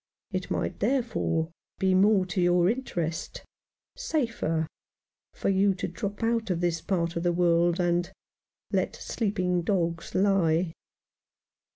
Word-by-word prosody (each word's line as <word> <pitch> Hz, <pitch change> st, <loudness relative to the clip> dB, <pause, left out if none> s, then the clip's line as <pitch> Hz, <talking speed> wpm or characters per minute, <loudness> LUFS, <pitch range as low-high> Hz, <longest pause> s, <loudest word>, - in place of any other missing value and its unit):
It -, -, -3 dB
might -, -, -2 dB
there 265 Hz, -2 st, +2 dB
fore 165 Hz, -7 st, -1 dB, 0.3 s
be 190 Hz, -1 st, +2 dB
more 195 Hz, 0 st, +4 dB
to 180 Hz, 0 st, -1 dB
your 175 Hz, 0 st, +4 dB
interest— 175 Hz, -9 st, -3 dB, 0.5 s
safer 230 Hz, -, -1 dB, 0.4 s
— -, -, -66 dB
for -, -, -1 dB
you 195 Hz, 0 st, +3 dB
to -, -, -3 dB
drop 200 Hz, +5 st, -5 dB
out 230 Hz, -1 st, +1 dB
of 175 Hz, -2 st, 0 dB
this 170 Hz, -2 st, 0 dB
part 170 Hz, -3 st, -1 dB
of 170 Hz, -, -1 dB
the 175 Hz, 0 st, +2 dB
world, 175 Hz, 0 st, +3 dB
and 175 Hz, 0 st, +1 dB, 0.3 s
— -, -, -46 dB
let -, -, 0 dB
sleep 210 Hz, -3 st, -3 dB
ing 180 Hz, -1 st, +1 dB
dogs 170 Hz, -3 st, -1 dB
lie." 185 Hz, -4 st, +2 dB
180 Hz, 150 wpm, -27 LUFS, 170-200 Hz, 0.5 s, more